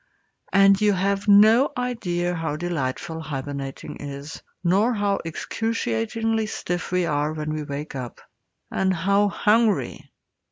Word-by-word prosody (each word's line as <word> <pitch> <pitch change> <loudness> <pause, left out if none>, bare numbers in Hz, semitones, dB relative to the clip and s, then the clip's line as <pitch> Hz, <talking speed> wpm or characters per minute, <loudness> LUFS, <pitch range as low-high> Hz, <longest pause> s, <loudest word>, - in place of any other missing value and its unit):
And 195 +1 +5
you 210 -1 +4
have 195 +2 0
no 215 +6 +6
idea 180 -8 -1
how 165 -3 -2
delightful 160 -1 -3
hibernating 140 -2 -6
is, 140 +2 -8 0.2
nor 200 +7 +3
how 205 -1 0
excruciatingly 220 - -2
stiff 175 -4 -4
we 180 -1 +1
are 150 -1 0
when 155 0 -3
we 155 - -3
wake 145 +1 -6
up, 125 -3 -6 0.5
and 190 0 +1
how 200 +4 +2
hungry! 215 +2 +1
175 Hz, 125 wpm, -24 LUFS, 150-205 Hz, 0.5 s, no